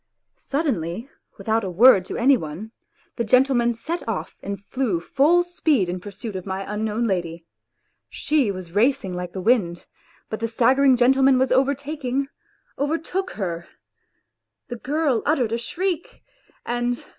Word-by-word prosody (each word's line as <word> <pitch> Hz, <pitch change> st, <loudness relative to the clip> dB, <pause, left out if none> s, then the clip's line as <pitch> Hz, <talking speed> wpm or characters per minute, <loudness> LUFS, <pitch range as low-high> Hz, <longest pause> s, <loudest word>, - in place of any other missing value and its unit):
Suddenly, 235 Hz, -, -2 dB, 0.3 s
without 220 Hz, +3 st, 0 dB
a 190 Hz, -, -3 dB
word 195 Hz, 0 st, +6 dB
to -, -, -5 dB
any 265 Hz, +4 st, +5 dB
one, 175 Hz, +3 st, -6 dB, 0.5 s
the 235 Hz, -, 0 dB
gentleman 240 Hz, 0 st, +3 dB
set 335 Hz, +9 st, -4 dB
off 215 Hz, -, -4 dB
and 200 Hz, 0 st, -5 dB
flew 245 Hz, -10 st, -1 dB
full 300 Hz, -, +3 dB
speed 315 Hz, -, +1 dB
in 180 Hz, +1 st, -3 dB
pursuit 205 Hz, +2 st, -8 dB
of 185 Hz, 0 st, -6 dB
my 190 Hz, 0 st, -3 dB
unknown 215 Hz, +2 st, -2 dB
lady. 170 Hz, -6 st, -2 dB, 0.6 s
She 295 Hz, -7 st, +1 dB
was 185 Hz, -3 st, -6 dB
racing 205 Hz, -2 st, +1 dB
like 180 Hz, 0 st, -5 dB
the 190 Hz, -, -4 dB
wind, 185 Hz, -6 st, +1 dB, 0.4 s
but 220 Hz, -, -5 dB
the 230 Hz, -, -1 dB
staggering 255 Hz, +4 st, +4 dB
gentleman 265 Hz, +2 st, +4 dB
was 260 Hz, +1 st, +1 dB
over 270 Hz, +2 st, +3 dB
taking 275 Hz, -1 st, -3 dB, 0.5 s
overtook 330 Hz, +6 st, -2 dB
her. 170 Hz, -4 st, -4 dB, 1.0 s
The 240 Hz, -, -5 dB
girl 280 Hz, -1 st, 0 dB
uttered 260 Hz, -7 st, +1 dB
a 230 Hz, -, -1 dB
shriek, 350 Hz, +7 st, -3 dB, 0.4 s
and 240 Hz, 0 st, -2 dB
235 Hz, 145 wpm, -23 LUFS, 195-275 Hz, 1.0 s, word